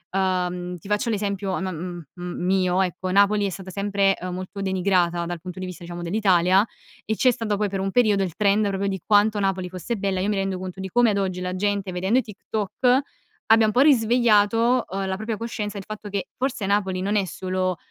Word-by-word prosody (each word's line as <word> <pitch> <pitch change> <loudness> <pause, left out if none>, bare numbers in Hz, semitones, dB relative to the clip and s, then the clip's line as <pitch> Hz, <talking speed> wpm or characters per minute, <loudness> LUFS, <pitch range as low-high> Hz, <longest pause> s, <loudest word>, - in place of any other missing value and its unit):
Uhm, 180 -1 -1
ti 185 - -14
faccio 210 +3 0
un 220 - +1
esempio 200 -1 -2
am 190 - -2
m 175 -1 -5 0.2
m 180 0 -4
mio 185 0 +2
ecco, 185 0 -3
Napoli 200 +1 +4
è - - -2
stata 190 0 -8
sempre 200 0 +1 0.2
molto 185 +2 -6
denigrata 180 -3 +1
dal 175 -1 -5
punto 180 0 -8
di 185 - -4
vista 180 -1 -8
diciamo 175 0 -7
dell'Italia 185 0 +3 0.4
e 220 - -1
c'è 255 +3 +4
stato 215 -3 -2
poi 210 0 0
per 195 0 -3
un 195 - -1
periodo 215 -4 +3
il 175 -3 -4
trend 205 +1 +2
proprio 195 +1 -1
di 190 -3 -3
quanto 210 0 +4
Napoli 190 -2 -1
fosse 185 +6 -4
bella. 195 -2 -1
Io 200 - 0
mi 210 - +1
rendo 195 -1 -1
conto 185 0 -7
di 190 - -4
come 240 +2 +4
ad 200 - 0
oggi 185 -2 -2
la 180 0 -3
gente 200 -1 -1
vedendo 190 +8 +1
i - - +1
TikTok 220 +4 0 0.5
abbia 225 0 +6
un 215 - +2
po' 245 - +1
risvegliato, 235 -2 +4
uhm, 195 +1 -3
la 190 - -1
propria 215 +3 -3
coscienza 210 -3 -4
il - - -8
fatto 215 -1 -7
che 200 -1 -3
forse 255 -5 -2
Napoli 190 -2 0
non 200 +2 0
è 200 -2 +2
solo, 185 -1 -2
195 Hz, 220 wpm, -24 LUFS, 185-210 Hz, 0.5 s, abbia